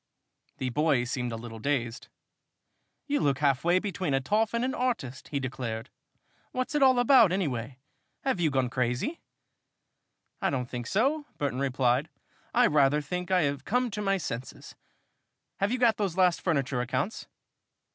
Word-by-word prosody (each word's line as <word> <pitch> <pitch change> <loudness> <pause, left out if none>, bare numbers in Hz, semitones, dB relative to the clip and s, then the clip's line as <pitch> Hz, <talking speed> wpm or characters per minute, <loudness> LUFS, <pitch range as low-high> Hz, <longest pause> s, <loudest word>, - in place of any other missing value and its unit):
The 130 -1 -2
boy 150 -2 +2
seemed 125 -1 -3
a - - -3
little 115 0 -8
dazed. 120 -2 -2 1.0
"You 290 0 0
look 140 -2 +1
half 140 -2 +2
way 175 +2 +4
between 185 -6 -1
a - - +2
toff 210 - 0
and 235 +2 +1
an 260 - -1
artist!" 230 - -2
he 140 - -2
declared. 125 -4 -4 0.6
"What's 255 +3 -2
it 295 - +1
all 260 -2 +6
about, 245 -5 +6
anyway? 135 - -2 0.5
Have 265 -9 0
you 165 -3 +3
gone 130 -2 +1
crazy?" 125 - -1 1.2
"I - - +2
don't 125 -3 -2
think 120 -1 -5
so," 285 +8 +1
Burton 140 -3 -2
replied. 130 +1 +1 0.4
"I - - +4
rather 145 0 +4
think 180 +5 -4
I 185 -2 +3
have 140 -1 -1
come 250 +5 0
to 210 +1 -4
my 195 -1 +1
senses. 125 -7 -6 0.8
Have 200 +2 0
you 250 - +1
got 235 -4 +3
those 195 -4 -2
last 180 -2 +3
furniture 140 -7 0
accounts?" 130 - -2
145 Hz, 165 wpm, -28 LUFS, 130-210 Hz, 1.2 s, all